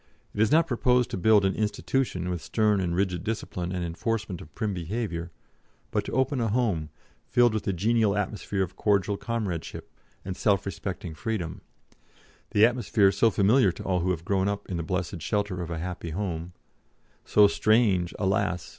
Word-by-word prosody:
It 105 - -1
is 110 - +3
not 165 +1 +5
proposed 125 -2 +2
to - - -2
build 105 +1 +4
an 95 - +2
'institution' 105 -3 -1
with 90 -2 -3
stern 105 +1 +1
and 85 -2 -1
rigid 90 -2 0
discipline 95 -5 -3
and 90 -2 -2
enforcement 100 +2 -3
of 80 - -13
prim 110 -3 -1
behaviour, 90 -1 -3 0.6
but - - 0
to - - -5
open 130 0 +1
a 115 - +1
home, 100 -9 0 0.4
filled 120 -2 +4
with 110 - -2
the - - +1
genial 105 +2 +2
atmosphere 105 -1 -2
of 90 0 -6
cordial 100 -1 +1
comradeship, 100 -7 -4 0.3
and 95 -1 -4
self 100 -1 +1
respecting 90 -2 -5
freedom 90 0 -4 0.9
the 105 +1 +5
atmosphere 115 -5 +3
so 115 +4 +3
familiar 105 +1 +4
to - - -9
all 90 -2 0
who 90 +2 -1
have 85 -2 -2
grown 95 0 +1
up 100 0 -3
in 90 - -3
the - - -2
blessed 90 0 -3
shelter 100 -1 -1
of 85 - -5
a 85 - -3
happy 85 0 -5
home, 85 -1 -4 0.7
so 105 - +5
strange, 100 -5 +2
alas! 95 -2 0
100 Hz, 180 wpm, -27 LUFS, 90-110 Hz, 0.9 s, not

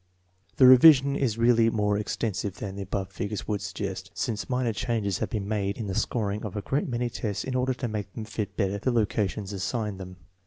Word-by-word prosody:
The 130 - +6
revision 135 +1 +8
is 120 -6 0
really 115 -1 +4
more 105 -2 +1
extensive 100 -1 -2
than 100 -1 -6
the 100 - -5
above 95 0 -3
figures 105 0 -4
would 105 -2 -1
suggest, 95 0 -5
since 110 0 -3
minor 125 -2 0
changes 105 -3 -1
have - - -2
been 105 -4 -3
made 100 -2 -1
in 115 - -4
the 100 - -3
scoring 105 0 -1
of 105 -1 -5
a 105 - -3
great 140 - -1
many 120 -1 -1
tests 105 -4 -3
in 130 - -4
order 130 0 0
to 125 - -3
make 105 -3 -4
them 110 - -5
fit 105 0 -5
better 100 -1 0
the 130 - 0
locations 105 -3 -1
assigned 105 +1 -3
them. 95 -1 -8
105 Hz, 210 wpm, -27 LUFS, 100-120 Hz, -, revision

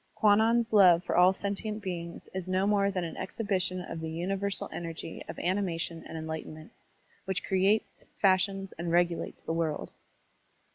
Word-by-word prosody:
Kwannon's 225 +2 +3
love 180 -4 +7
for - - -2
all 180 +1 +7
sentient 205 +2 -3
beings 170 -3 -5
is 185 -1 -4
no 185 +1 +1
more 200 -1 +3
than 185 -3 -2
an 165 -2 -5
exhibition 185 -2 -1
of 170 -2 -6
the 160 0 -4
universal 195 +4 -2
energy 165 -1 -6
of - - -6
animation 175 -3 -2
and 165 - -7
enlightenment, 160 0 -6 0.5
which 190 -1 -2
creates, 195 +3 +1 0.2
fashions, 195 0 +2
and 170 0 -2
regulates 175 0 0
the 165 - -2
world. 165 -2 -2
185 Hz, 150 wpm, -29 LUFS, 170-200 Hz, 0.5 s, love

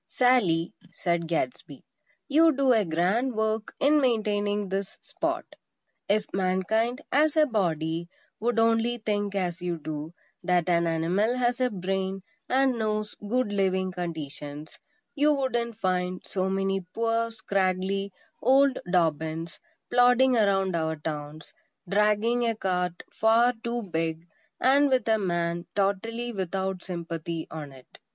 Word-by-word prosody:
"Sally," 200 -11 +2 0.2
said 170 -2 -1
Gadsby, 170 +9 -3 0.4
"you 320 +3 +5
do 270 -2 +4
a 220 -2 +3
grand 190 +9 0
work 220 0 -1
in 295 +1 +4
maintaining 210 -4 0
this 195 +1 -3
spot. - - -3 0.6
If 210 +1 +2
Mankind, 205 +7 0
as 305 +2 +3
a 310 - +6
body, 170 - -1 0.3
would 235 +2 0
only 230 +1 +2
think 205 -2 -2
as 180 -2 -2
you 175 -1 -2
do, 155 +1 -6 0.3
that 180 -2 +2
an 170 -1 +3
animal 180 +9 +1
has 245 0 0
a 250 - +3
brain, 190 -1 -3 0.3
and 260 -2 +2
knows 215 -1 -1 0.2
good 250 -2 +1
living 190 -1 +1
conditions, 155 -4 -6 0.3
you 295 +1 +3
wouldn't 240 -5 -1
find 180 -2 -1
so 190 -1 -1
many 195 0 0
poor, 230 0 +1
scraggly 195 -2 -1 0.3
old 270 +3 +4
Dobbins 160 -1 0 0.3
plodding 245 +1 +5
around 195 -4 +2
our 160 -1 0
towns, 150 0 -6 0.3
dragging 210 +5 +2
a 225 - -1
cart 180 -3 -2
far 230 +3 +4
too 235 0 -2
big; 165 -3 -3 0.3
and 280 +2 +4
with 255 -4 +1
a 220 -1 +3
man 175 -2 -1
totally 225 +5 -1
without 190 -2 -3
sympathy 170 -2 -5
on 150 -3 -7
it." 130 -1 -17
195 Hz, 130 wpm, -27 LUFS, 175-235 Hz, 0.6 s, a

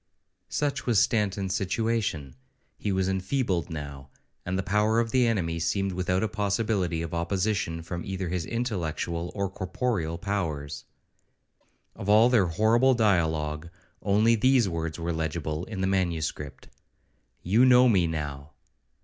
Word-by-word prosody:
Such 145 -3 -2
was 115 -5 +4
Stanton's 100 -4 +1
situation; 95 - -1 0.5
he 105 - -1
was 95 -1 +1
enfeebled 95 - -1
now, 70 -4 -7 0.4
and 95 +1 -1
the 95 - -1
power 105 +3 +2
of 115 -1 0
the 125 -2 +3
enemy 85 -7 0
seemed 95 +3 0
without 90 +1 0
a - - +2
possibility 100 -5 -1
of 85 - -6
opposition 85 -1 -1
from 85 +1 -5
either 95 -1 -4
his 85 -2 -2
intellectual 85 -7 -2
or 100 -1 0
corporeal 95 -2 -2
powers. 80 -9 -3 1.1
Of 100 - -6
all 110 +3 +6
their 110 -7 +4
horrible 115 +9 +3
dialogue, 80 -7 +1 0.3
only 105 +3 +3
these 125 0 +3
words 80 -2 -3
were 85 0 -2
legible 80 0 -3
in 105 -4 -5
the - - +1
manuscript, 85 -6 -2 0.8
'You 105 +8 +4
know 125 0 +7
me 95 -7 +3
now.' 75 -3 -5
95 Hz, 140 wpm, -27 LUFS, 85-110 Hz, 1.1 s, know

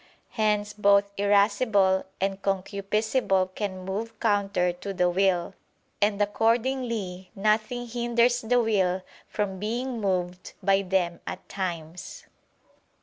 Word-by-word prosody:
Hence 210 -2 0
both 200 -1 +3
irascible 200 -1 +3
and 195 0 -1
concupiscible 195 0 0
can 190 -3 -4
move 215 +4 -4
counter 200 -5 +1
to 195 +3 -6
the 180 -1 +2
will: 185 -1 +1 0.5
and 205 0 +2
accordingly 225 -3 0
nothing 215 +4 0
hinders 240 +1 +1
the 245 +2 +2
will 190 -5 +1 0.2
from 195 -3 -3
being 235 +3 -3
moved 180 -2 -2
by 195 0 +4
them 180 -3 0
at - - -6
times. 175 -3 -5
200 Hz, 110 wpm, -26 LUFS, 190-220 Hz, 0.5 s, by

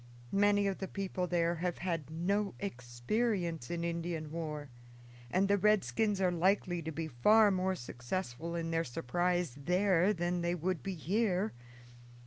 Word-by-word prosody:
Many 205 0 +4
of 195 -1 -1
the 190 - -3
people 185 -2 -3
there 170 -1 +1
have 175 +1 -2
had 165 -5 -3
no 195 +5 -1
experience 165 - -2
in 170 -1 -2
Indian 170 -2 -3
war, 150 -4 -5 0.6
and 190 +8 +2
the 200 0 +3
redskins 205 - +2
are 185 -2 +3
likely 175 0 +1
to 160 0 -4
be 160 +1 -3
far 205 - +5
more 185 0 +1
successful 125 +4 -4
in 165 -1 -2
their 165 0 +1
surprise 175 +4 -1
there 180 +5 +2
than 175 -2 -1
they 170 +1 0
would 180 +1 -1
be 195 -1 -4
here. 195 +4 0
175 Hz, 150 wpm, -33 LUFS, 165-195 Hz, 0.6 s, far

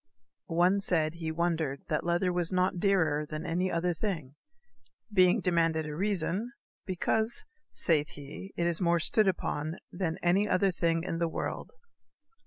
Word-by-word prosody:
One 180 +3 +3
said 160 -5 +1
he 165 -1 -4
wondered 160 -4 -1
that 150 - 0
lether 175 +1 +1
was 175 0 +1
not 185 -1 +1
dearer 165 -7 +2
than 155 +2 -6
any 180 +2 0
other 175 +1 0
thing. 160 -8 -3 0.8
Being 185 -2 +5
demanded 165 -3 +1
a 150 -1 -5
reason: 200 - -1 0.3
because, 220 +5 0 0.3
saith 150 -3 +2
he, 145 +7 -9
it 170 - +1
is 170 0 0
more 170 -1 +3
stood 215 +5 +3
upon 160 -3 -1
than 175 -2 -2
any 190 +4 +3
other 195 +1 +3
thing 165 -2 0
in 165 -2 -3
the 170 - +1
world. 160 - -4
170 Hz, 155 wpm, -30 LUFS, 160-185 Hz, 0.8 s, Being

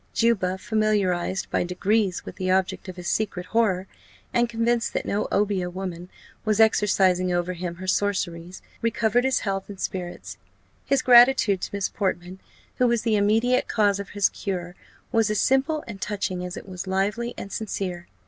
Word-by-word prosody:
Juba, 195 -6 +1
familiarized 190 -4 0
by - - +1
degrees 190 +2 0
with - - -9
the 185 0 -2
object 190 +1 0
of 185 - -7
his 180 -1 -7
secret 185 -1 -1
horror, 190 -4 +1 0.5
and 240 0 +2
convinced 235 0 0
that - - -2
no 205 +1 -1
obeah 200 -3 +1
woman 180 -1 -6 0.3
was 215 -1 +1
exercising 190 -4 +3
over 175 +1 0
him 175 -1 -5
her 185 +2 -8
sorceries, 185 -3 -1 0.2
recovered 230 +1 +1
his 265 -1 +2
health 195 -1 -3
and 200 -2 -9
spirits. 180 -2 -5 0.5
His 275 -2 +2
gratitude 240 -6 +6
to - - -4
Miss 200 - 0
Portman, 185 -2 -3 0.4
who 250 - +3
was 235 -2 +1
the 225 -2 +2
immediate 225 +5 +2
cause 205 -3 +2
of 200 - -6
his 200 - +4
cure, 180 -3 -4 0.4
was 225 -3 +2
as 215 - 0
simple 275 +4 +2
and 205 -4 -9
touching 190 -3 -2
as 180 -1 -6
it - - -9
was 185 0 -7
lively 205 +6 -1
and 195 - -7
sincere. 185 -5 -4
200 Hz, 170 wpm, -25 LUFS, 185-225 Hz, 0.5 s, gratitude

